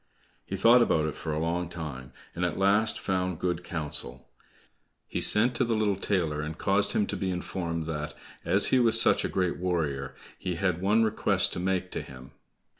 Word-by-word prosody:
He 95 Hz, -, -3 dB
thought 115 Hz, +6 st, +6 dB
about 80 Hz, -9 st, +2 dB
it 75 Hz, -, -2 dB
for 80 Hz, -, -5 dB
a 75 Hz, -, -2 dB
long 85 Hz, +2 st, -1 dB
time, 75 Hz, -7 st, -7 dB, 0.2 s
and 90 Hz, -, -3 dB
at 90 Hz, -2 st, -1 dB
last 100 Hz, +3 st, +3 dB
found 90 Hz, -2 st, -1 dB
good 90 Hz, 0 st, -2 dB
counsel. 75 Hz, -6 st, -4 dB, 0.8 s
He -, -, -3 dB
sent 120 Hz, +4 st, +3 dB
to 130 Hz, -, +2 dB
the 115 Hz, -2 st, 0 dB
little 105 Hz, -2 st, +1 dB
tailor 85 Hz, -6 st, -1 dB
and 75 Hz, +1 st, -5 dB
caused 100 Hz, 0 st, +1 dB
him 105 Hz, -, +2 dB
to -, -, -4 dB
be 95 Hz, -, -2 dB
informed 85 Hz, -2 st, -3 dB
that 75 Hz, -2 st, -4 dB, 0.3 s
as -, -, +4 dB
he 130 Hz, -, +6 dB
was 115 Hz, -2 st, +4 dB
such -, -, +4 dB
a -, -, -1 dB
great 90 Hz, -2 st, -1 dB
warrior, 75 Hz, -7 st, -2 dB, 0.2 s
he 90 Hz, -2 st, -3 dB
had 90 Hz, -1 st, -1 dB
one 105 Hz, +4 st, +3 dB
request 110 Hz, -1 st, +2 dB
to -, -, -3 dB
make 90 Hz, 0 st, -1 dB
to -, -, -3 dB
him. 65 Hz, 0 st, -12 dB
90 Hz, 195 wpm, -28 LUFS, 80-100 Hz, 0.8 s, thought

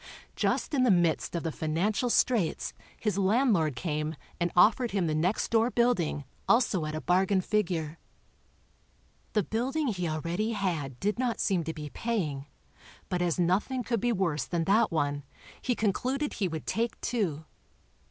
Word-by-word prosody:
Just -, -, 0 dB
in 275 Hz, -, +3 dB
the 255 Hz, -, +4 dB
midst 175 Hz, -3 st, +2 dB
of 170 Hz, -, -2 dB
the 165 Hz, -, -1 dB
financial 180 Hz, +11 st, 0 dB
straits 225 Hz, -8 st, +1 dB, 0.3 s
his 210 Hz, -3 st, 0 dB
landlord 195 Hz, -, +3 dB
came 150 Hz, +2 st, -2 dB, 0.2 s
and 175 Hz, 0 st, 0 dB
offered 230 Hz, +6 st, +5 dB
him 195 Hz, -3 st, 0 dB
the 155 Hz, -, 0 dB
next 175 Hz, +7 st, 0 dB
door 230 Hz, +1 st, +3 dB
building 235 Hz, -, +1 dB, 0.3 s
also 210 Hz, -9 st, +3 dB
at 155 Hz, -, -4 dB
a 155 Hz, -, -3 dB
bargain 190 Hz, +2 st, +2 dB
figure. 175 Hz, -6 st, -1 dB, 1.3 s
The 210 Hz, -, +2 dB
building 260 Hz, -, -1 dB
he 180 Hz, -5 st, -2 dB
already 170 Hz, +8 st, -1 dB
had 160 Hz, -, -2 dB
did 210 Hz, +3 st, -1 dB
not 250 Hz, -3 st, 0 dB
seem 185 Hz, -4 st, +1 dB
to 160 Hz, -, -3 dB
be 150 Hz, -2 st, -7 dB
paying, 155 Hz, -12 st, -2 dB, 0.6 s
but 180 Hz, -2 st, -1 dB
as 175 Hz, -2 st, +1 dB
nothing 200 Hz, +9 st, +1 dB
could 235 Hz, -2 st, -1 dB
be 240 Hz, -, +2 dB
worse 170 Hz, -, 0 dB
than 170 Hz, -2 st, -1 dB
that 210 Hz, +5 st, +3 dB
one, 145 Hz, -3 st, 0 dB, 0.4 s
he 245 Hz, -, 0 dB
concluded 255 Hz, +8 st, -1 dB
he 195 Hz, -, -1 dB
would 160 Hz, -2 st, -5 dB
take 230 Hz, +1 st, -1 dB
two. 180 Hz, -, -1 dB
185 Hz, 160 wpm, -29 LUFS, 160-230 Hz, 1.3 s, offered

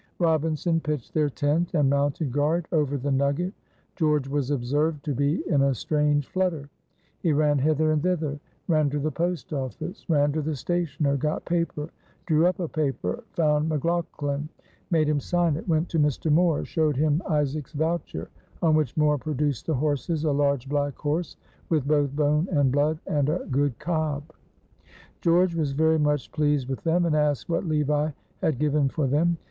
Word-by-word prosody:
Robinson 165 Hz, 0 st, +1 dB
pitched 150 Hz, -6 st, -4 dB
their 150 Hz, -2 st, +2 dB
tent 150 Hz, +6 st, 0 dB
and 150 Hz, -3 st, +3 dB
mounted 140 Hz, +1 st, 0 dB
guard 155 Hz, +5 st, +1 dB
over 145 Hz, -4 st, +1 dB
the 140 Hz, +2 st, -2 dB
nugget. 140 Hz, +7 st, 0 dB, 0.4 s
George 150 Hz, -5 st, +1 dB
was 140 Hz, -1 st, -1 dB
observed 145 Hz, +3 st, 0 dB
to 145 Hz, -, -1 dB
be 145 Hz, +5 st, 0 dB
in 145 Hz, -6 st, +2 dB
a 135 Hz, -1 st, +2 dB
strange 150 Hz, +3 st, +1 dB
flutter. 170 Hz, -6 st, -2 dB, 0.5 s
He 165 Hz, -4 st, +1 dB
ran 145 Hz, -1 st, +3 dB
hither 155 Hz, +2 st, +2 dB
and 155 Hz, -1 st, +1 dB
thither. 155 Hz, -5 st, -1 dB, 0.3 s
Ran 155 Hz, -4 st, +3 dB
to 145 Hz, -, -2 dB
the 155 Hz, +2 st, -1 dB
post 170 Hz, +1 st, -2 dB
office 150 Hz, -, -5 dB
ran 145 Hz, -2 st, +3 dB
to 155 Hz, +2 st, -1 dB
the 155 Hz, +1 st, -2 dB
stationer 150 Hz, -1 st, -1 dB
got 150 Hz, +3 st, -2 dB
paper 170 Hz, -3 st, -2 dB, 0.3 s
drew 160 Hz, 0 st, +3 dB
up 185 Hz, -, -1 dB
a 175 Hz, -, -1 dB
paper 155 Hz, -, -2 dB
found 150 Hz, -1 st, +2 dB
McLaughlan 155 Hz, -2 st, -2 dB, 0.4 s
made 160 Hz, -4 st, +2 dB
him 150 Hz, -1 st, +2 dB
sign 175 Hz, 0 st, +1 dB
it 165 Hz, -, -7 dB
went 165 Hz, 0 st, +1 dB
to 165 Hz, -, 0 dB
Mr. 150 Hz, +1 st, +1 dB
Moore 165 Hz, 0 st, +3 dB
showed 155 Hz, -4 st, 0 dB
him 155 Hz, +2 st, +2 dB
Isaac's 150 Hz, -1 st, -1 dB
voucher; 155 Hz, -, -2 dB, 0.3 s
on 160 Hz, -2 st, +4 dB
which 155 Hz, -4 st, +1 dB
Moore 150 Hz, -1 st, +3 dB
produced 145 Hz, -2 st, -2 dB
the 160 Hz, -, +1 dB
horses, 150 Hz, +3 st, -1 dB
a 155 Hz, -, +2 dB
large 140 Hz, -2 st, +1 dB
black 145 Hz, -1 st, -1 dB
horse 155 Hz, +3 st, -2 dB, 0.3 s
with 150 Hz, -5 st, +1 dB
both 145 Hz, -2 st, +1 dB
bone 150 Hz, +3 st, +2 dB
and 145 Hz, -5 st, +3 dB
blood, 145 Hz, +3 st, +2 dB
and 145 Hz, -2 st, +1 dB
a 170 Hz, +4 st, -1 dB
good 140 Hz, -2 st, +1 dB
cob. 155 Hz, -3 st, -1 dB, 1.0 s
George 175 Hz, +1 st, +3 dB
was 150 Hz, -4 st, -1 dB
very 160 Hz, +2 st, +3 dB
much 150 Hz, -2 st, 0 dB
pleased 145 Hz, -4 st, +1 dB
with 135 Hz, -1 st, -4 dB
them, 170 Hz, +1 st, +2 dB
and 160 Hz, -2 st, +1 dB
asked 150 Hz, -1 st, 0 dB
what 170 Hz, +1 st, -1 dB
Levi 150 Hz, -1 st, +1 dB, 0.3 s
had 155 Hz, -5 st, +1 dB
given 150 Hz, 0 st, +2 dB
for 150 Hz, +1 st, -1 dB
them. 160 Hz, +6 st, +2 dB
150 Hz, 175 wpm, -25 LUFS, 145-160 Hz, 1.0 s, on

